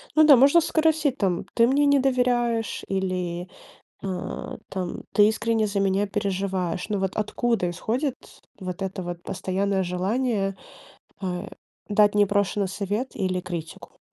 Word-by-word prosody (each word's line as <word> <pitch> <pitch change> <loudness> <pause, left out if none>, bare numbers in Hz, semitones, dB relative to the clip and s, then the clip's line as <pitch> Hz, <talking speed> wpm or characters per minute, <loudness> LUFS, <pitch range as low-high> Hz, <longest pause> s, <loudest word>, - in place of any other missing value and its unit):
Ну 310 - +7
да, 295 -2 +9
можно 280 +7 +6
спросить, 315 -2 +2
там: 195 -9 -1
"Ты 230 0 +4
мне 280 +3 +3
не 285 -1 +5
доверяешь 245 -3 +1
или, 180 -2 -2 0.6
а, 190 -2 -5
там, 185 -2 -4
ты 210 0 +6
искренне 220 0 +1
за 200 -1 -1
меня 195 +1 +2
переживаешь? 190 -3 -2
Ну, 210 -2 -1
вот 190 -1 -2
откуда 220 -2 0
исходит 245 - -2 0.4
вот 185 0 -5
это 190 0 -3
вот 175 -1 -6
постоянное 190 +1 -1
желание, 195 +3 -1 0.6
а, 180 -2 -3 0.4
дать 205 0 +4
непрошенный 205 -1 +2
совет 205 +6 -3
или 185 -1 -1
критику?" 170 -3 -7
200 Hz, 135 wpm, -25 LUFS, 185-235 Hz, 0.6 s, да